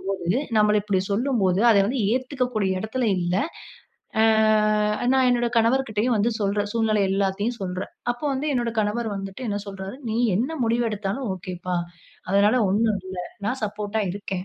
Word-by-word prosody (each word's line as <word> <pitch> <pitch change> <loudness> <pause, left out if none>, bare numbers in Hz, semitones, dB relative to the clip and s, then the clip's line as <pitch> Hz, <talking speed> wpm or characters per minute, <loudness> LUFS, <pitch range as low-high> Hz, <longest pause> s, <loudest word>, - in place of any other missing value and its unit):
அப்படிங்கம்போது, 190 +2 -1 0.2
நம்மள 210 0 +4
இப்படி 200 -2 0
சொல்லும்போது 205 -5 +1
அத 220 - +5
வந்து 255 +4 -1
ஏத்துக்கக்கூடிய 250 -7 -1
இடத்துல 240 +3 -2
இல்ல. 175 0 -1 0.9
ஆ - - +5 0.9
நான் 265 -1 +4
என்னோட 240 -1 +2
கணவர்க்கிட்டயும் 230 -1 +1
வந்து 220 +3 +2
சொல்றேன். 205 0 0
சூழ்நிலை 220 -2 +1
எல்லாத்தையும் 200 +4 0
சொல்றேன். 185 0 -4 0.2
அப்ப 240 - -15
வந்து 270 +3 -2
என்னோட 240 -1 0
கணவர் 220 +2 -1
வந்துட்டு 195 +5 -7
என்ன 205 - -1
சொல்றாரு, 195 +2 -7
"நீ 220 - -1 0.2
என்ன 255 +9 -1
முடிவு 235 +1 +1
எடுத்தாலும் 210 +4 -3
ஒகேப்பா! 180 -1 -4 0.5
அதனால 205 +3 +4 0.2
ஒன்னும் 215 0 +2
இல்ல. 185 -1 -6 0.3
நான் 250 +4 -2
சப்போர்ட்டா 210 +1 -3
இருக்கேன். 195 -2 -5
210 Hz, 150 wpm, -24 LUFS, 195-240 Hz, 0.9 s, அத